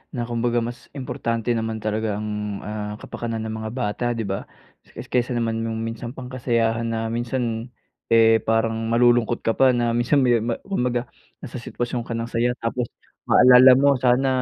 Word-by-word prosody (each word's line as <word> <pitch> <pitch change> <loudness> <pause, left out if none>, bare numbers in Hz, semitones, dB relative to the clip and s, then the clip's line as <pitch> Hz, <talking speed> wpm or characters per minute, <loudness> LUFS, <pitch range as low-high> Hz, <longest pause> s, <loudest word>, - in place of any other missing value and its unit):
na 120 - -2
kumbaga 120 0 0
mas 120 +1 -7
importante 115 -3 -2
naman 115 -1 -1
talaga 110 0 -1
ang, 105 -1 -4
ah, 105 0 -5
kapakanan 115 0 -5
ng 110 0 -4
mga 110 0 -5
bata, 120 -1 -2
di 115 - -2
ba? 95 -1 -4 0.5
Es - - -9
kaysa 125 0 0
naman 115 -1 -1
yung 110 0 -3
minsan 115 +2 -6
pang 125 0 -8
kasayahan 115 -2 0
na 115 0 -2
minsan 120 -1 -2 0.4
,eh, 115 -1 +5
parang 115 +1 0
malulungkot 120 0 +3
ka 115 - +2
pa, 130 +2 +4
na 120 -1 +1
minsan 120 +4 +2
me 120 -2 +4
ma 115 +1 -2
kumbaga 125 -9 -2 0.3
nasa 125 -2 -6
sitwasyon 120 0 -4
ka 115 - -3
ng 115 0 -2
saya 120 +1 +1
tapos 120 +1 -2 0.4
maalala 125 +1 +8
mo 140 -1 +3
sana 125 +2 +3
115 Hz, 175 wpm, -23 LUFS, 115-125 Hz, 0.5 s, maalala